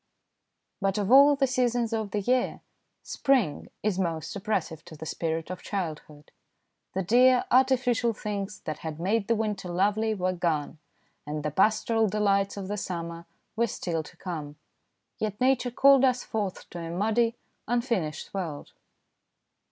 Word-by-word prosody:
But 195 +1 +1
of 205 +1 -1
all 280 +2 +8
the 275 -1 +2
seasons 245 -2 0
of 220 -2 -1
the 205 +1 -1
year, 250 +4 0 0.4
spring 245 - 0
is 205 -3 0
most 165 -3 -2
oppressive 190 -6 -2
to 160 - -11
the 155 +1 -8
spirit 165 +1 -3
of 185 - -6
childhood. 155 -5 -5 0.6
The 190 - 0
dear, 250 +6 +5
artificial 250 -2 +3
things 205 -2 -5
that 155 - -5
had 160 -1 -6
made 200 +4 0
the 230 - +3
winter 210 -4 -2
lovely 210 +5 +1
were 185 -1 0
gone, 160 -4 -1 0.5
and 150 0 -4
the 150 - -1
pastoral 220 +5 +2
delights 200 -1 +1
of 195 -2 -5
the 205 +1 -3
summer 170 -3 -5 0.3
were 235 +1 +2
still 170 -5 -3
to 155 - -14
come, 155 -6 -6 0.6
yet 210 -1 -3
Nature 255 -1 +2
called 270 +2 +5
us 255 -1 +3
forth 205 -4 -4
to 175 - -6
a 165 -1 -5
muddy, 220 +6 +1 0.3
un 240 +1 +2
finished 185 - -3
world. 170 -7 -5
200 Hz, 155 wpm, -27 LUFS, 170-235 Hz, 0.6 s, all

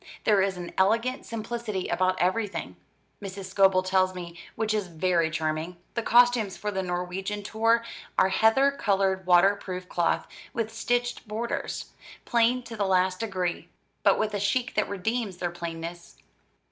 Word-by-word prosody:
There 205 -3 +4
is 190 -1 0
an 175 -1 -6
elegant 230 +7 +1
simplicity 225 -3 -4
about 185 0 +1
everything, 200 +3 -1 0.5
Mrs. 195 -1 -6
Scobel 190 0 +4
tells 185 0 +2
me, 170 -1 -7 0.2
which 220 -1 0
is 210 -3 -1
very 170 -1 +1
charming. 160 +2 -2 0.2
The 235 - -1
costumes 240 -4 +4
for 210 - -3
the 190 -1 -1
Norwegian 185 +3 -3
tour 225 +2 +2 0.3
are 190 - +5
heather 225 +8 +4
coloured 195 -7 0
water 180 +3 +6
proof 185 -2 -6
cloth, 175 -1 0 0.3
with 225 -1 -2
stitched 245 +1 -1
borders, 225 +3 -4 0.3
plain 240 +1 +2
to 235 - -8
the 205 -2 0
last 185 0 +2
degree, 185 -6 -2 0.3
but - - +4
with 215 -1 -1
a 205 - -1
chic 240 +6 0
that 210 - 0
redeems 205 0 -2
their 175 -1 -2
plainness. 170 0 -7
195 Hz, 155 wpm, -27 LUFS, 180-225 Hz, 0.5 s, water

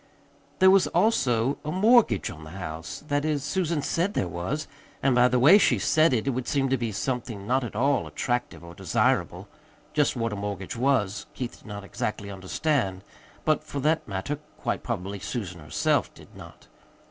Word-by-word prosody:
There 190 0 +7
was 195 -1 +5
also 135 - +2
a 150 - -3
mortgage 200 - +4
on 80 - -11
the 75 - -10
house. 80 - -6
That 145 -1 0
is, 150 -3 0
Susan 155 0 -1
said 180 +7 0
there 90 - 0
was; 90 - -3 0.4
and 135 - +4
by 125 0 +5
the 125 0 +1
way 155 +12 +7
she - - +3
said 155 +1 +3
it, 120 -2 0
it 135 - +1
would 130 0 -3
seem 135 -2 +1
to 135 - +3
be 115 -2 -2
something 115 -2 -3
not 130 +4 +1
at 115 - -6
all 135 +3 +1
attractive 120 -7 -3
or 85 0 -10
desirable. - - 0 0.5
Just 150 -2 +2
what 115 -3 -1
a - - -3
mortgage 100 -2 -5
was, 115 -6 0
Keith 125 -2 -5
did - - -18
not 100 -1 -7
exactly 100 0 -4
understand; 95 +1 -1 0.4
but, 155 -1 +2
for 145 - -5
that 160 +3 +1
matter, 100 +9 -3 0.2
quite - - -2
probably 100 -3 -4
Susan 95 -3 -5
herself 75 -1 0
did - - -16
not. - - -13
125 Hz, 185 wpm, -26 LUFS, 100-150 Hz, 0.5 s, There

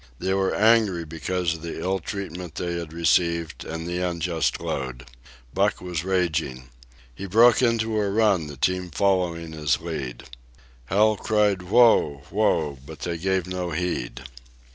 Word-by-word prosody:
They 95 +9 -1
were 95 0 +1
angry 105 -6 +3
because 85 +2 -2
of 80 - -9
the 85 -1 -6
ill 95 +3 -1
treatment 90 -3 -6
they 85 0 -3
had 85 -2 -7
received 85 0 +1
and 80 +1 -5
the 90 +1 -2
unjust 85 -2 -1
load. 65 -3 -4 0.5
Buck - - +1
was 90 -3 -4
raging. 80 -9 -1 0.4
He 100 +10 -7
broke 115 +5 +5
into 115 -2 +1
a 100 - 0
run, 100 -6 +2
the 75 -2 -9
team 90 +5 0
following 85 -3 0
his 75 -2 0
lead. 70 -7 -5 0.6
Hal 105 - +3
cried 105 -3 +1
"Whoa! 90 - +4
whoa!" 80 -9 +1
but - - -11
they 85 -1 -3
gave 95 0 0
no 90 -1 -3
heed. 80 -7 -3
90 Hz, 150 wpm, -24 LUFS, 80-95 Hz, 0.6 s, broke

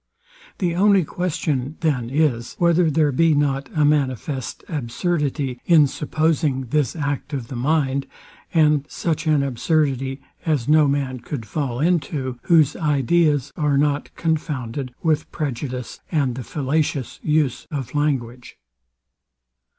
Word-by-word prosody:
The 175 -3 0
only 195 +1 +4
question 150 -5 -2
then 135 -8 0
is, 135 -5 0
whether 170 -1 +3
there 150 -1 +2
be 160 +3 +3
not 140 -1 0
a 150 -1 +3
manifest 135 -3 -1
absurdity 145 -2 -2
in 160 -4 +7
supposing 150 -1 0
this 150 -1 +1
act 145 -2 -3
of 125 -5 -4
the 130 - -6
mind, 140 +1 0 0.4
and 150 -3 +3
such 160 -1 -2
an 150 -2 +3
absurdity 135 0 0 0.2
as 150 -8 0
no 150 0 +5
man 135 -2 -1
could 120 -1 -6
fall 125 +2 -3
into, 145 -6 0
whose 155 -4 +4
ideas 150 -1 +1
are 150 -3 +1
not 145 0 +1
confounded 140 -6 -2
with 155 -2 +1
prejudice 130 -4 -4
and 140 -7 +1
the 125 +1 -6
fallacious 145 -1 -2
use 150 -5 0
of 140 -5 -5
language. 130 -5 -2
145 Hz, 125 wpm, -22 LUFS, 130-155 Hz, 0.4 s, in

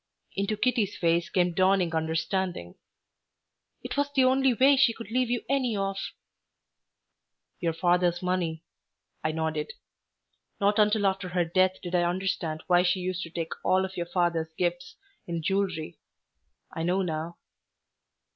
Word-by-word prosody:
Into 200 +2 -1
Kitty's 225 -4 0
face 170 -1 +1
came 180 -1 +1
dawning 185 -1 +2
understanding. 160 - -2 1.1
"It - - -5
was 285 0 +1
the 270 -2 +3
only 265 +1 +4
way 265 +4 +5
she 265 -3 +4
could 230 -2 -9
leave 250 0 +1
you 245 -1 -1
any 255 -5 0
of 195 0 -1 0.9
" - - -54
"Your 165 -1 0
father's 175 +1 +2
money," 175 -3 -1 0.6
I 155 - +1
nodded. 160 -1 -2 0.9
"Not 205 +1 +2
until 210 0 +3
after 190 -1 0
her 175 -1 +1
death 185 +2 +2
did 175 0 -6
I 175 - +3
understand 175 -3 -2
why 175 -1 +4
she 180 +1 +1
used 185 0 -3
to 165 - -6
take 165 -1 -4
all 190 0 +3
of 190 0 -8
your 170 -1 -3
father's 170 -3 0
gifts 175 0 -2 0.3
in 170 -2 -3
jewelry. 185 -4 -1 0.7
I 165 - -4
know 180 +3 +1
now." 165 0 -4
180 Hz, 150 wpm, -27 LUFS, 170-200 Hz, 1.1 s, way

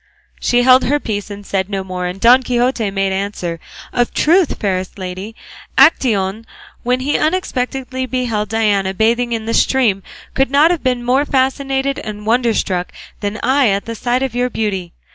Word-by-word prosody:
She 245 0 +2
held 255 +1 +6
her 290 +4 +1
peace 205 -5 -4
and 205 0 -9
said 190 0 -2
no 195 -2 -3
more, 180 -1 -4
and 180 +2 -6
Don 245 +5 +6
Quixote 245 -3 0
made 195 0 -1
answer, 190 -4 -3 0.3
"Of 245 -1 +2
a - - -29
truth, 340 +1 +2
fairest 185 -2 -2
lady, 190 +3 -6 0.4
Actaeon 225 - +3 0.3
when 250 +1 0
he 285 +3 0
unexpectedly 260 -6 -2
beheld 235 -5 -2
Diana 205 -4 +1
bathing 235 +3 +1
in 225 -1 -2
the 230 - -2
stream 230 -8 +2 0.3
could 270 -1 +1
not 290 +5 +4
have 345 - -1
been 250 -2 -1
more 260 +3 +3
fascinated 270 0 0
and 210 -1 -7
wonderstruck 220 -6 0 0.3
than 205 +1 -3
I 265 +1 +3
at 200 -1 0
the 230 - -5
sight 245 +3 -1
of 265 -3 -2
your 245 +1 0
beauty. 195 -7 -3
230 Hz, 175 wpm, -17 LUFS, 200-260 Hz, 0.4 s, held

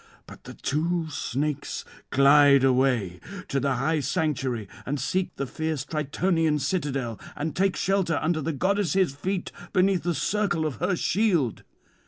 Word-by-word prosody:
But - - -14
the - - -9
two 160 +2 -1
snakes 145 +1 -3 0.2
glide 140 0 +6
away 125 -9 +2 0.3
to 140 - +1
the 140 +1 0
high 160 0 +1
sanctuary 135 - -1 0.2
and 145 +2 -3
seek 180 +8 -1
the 140 - -2
fierce 155 0 -3
Tritonian's 155 0 0
citadel, 135 - -2
[227 155 +2 -5
261]and - - -22
take 195 0 +2
shelter 190 -5 +1
under 155 0 0
the 165 - -1
goddess' 185 0 +1
feet 185 +6 -3 0.2
beneath 190 -2 +3
the 175 0 -1
circle 195 -6 0
of 150 -4 -3
her 180 +2 0
shield. 175 - +1
155 Hz, 150 wpm, -26 LUFS, 140-180 Hz, 0.3 s, glide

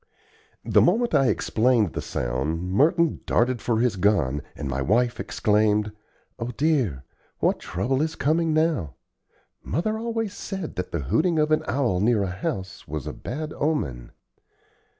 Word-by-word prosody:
The - - +4
moment 230 +7 +2
I 135 - +4
explained 115 -5 +2
the - - -3
sound, 75 +9 -2
Merton 165 - +3
darted 120 0 +2
for 115 -2 0
his 120 -4 +1
gun, 85 -8 +2
and 75 - -5
my 65 0 -2
wife 120 - +1
exclaimed: 105 0 +1 0.5
"O 115 - -3
dear! 125 - 0 0.3
what - - +1
trouble 130 +10 -1
is 160 +1 -1
coming 160 +3 +1
now? 155 - +1 0.7
Mother 215 +7 -1
always 225 -3 -2
said 190 -5 -5
that 90 - -4
the 85 - -2
hooting 160 - +1
of 155 0 +2
an 155 - +3
owl 120 -8 +1
near 105 0 +2
a 95 - -2
house 95 +1 -5
was 75 -2 -5
a - - -4
bad 150 +4 -5
omen." 65 - -2
120 Hz, 150 wpm, -25 LUFS, -, 0.7 s, The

